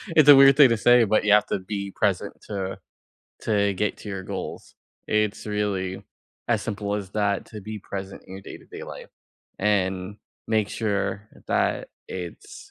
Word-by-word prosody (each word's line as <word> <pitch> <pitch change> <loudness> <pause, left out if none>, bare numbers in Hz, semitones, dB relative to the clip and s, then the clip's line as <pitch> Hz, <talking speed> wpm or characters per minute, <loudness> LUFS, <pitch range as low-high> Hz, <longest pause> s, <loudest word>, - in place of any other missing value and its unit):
It's 155 -2 +6
a 145 - +11
weird 135 0 +8
thing 140 -4 +8
to 115 - +3
say, 120 +1 +6
but 110 0 +2
you 105 - +4
have 105 0 +5
to - - -2
be 100 +1 -5
present 100 -1 0
to 95 -2 -4 0.7
to 100 -2 +2
get 105 +2 -1
to 105 - -8
your 95 -1 -4
goals. - - -6 0.3
It's 105 0 0
really 100 -3 -2 0.4
as 115 -3 +2
simple 105 -1 -3
as 100 -2 -4
that 100 -2 0
to 105 -2 -9
be 110 +2 -6
present 95 -1 -7
in 95 - -10
your 95 - -9
day-to-day - - -10
life, - - -9 0.5
and 95 -1 0 0.3
make 110 -2 +1
sure 100 -1 -2 0.2
that - - 0 0.2
it's 90 -2 -8
105 Hz, 170 wpm, -25 LUFS, 95-110 Hz, 0.7 s, a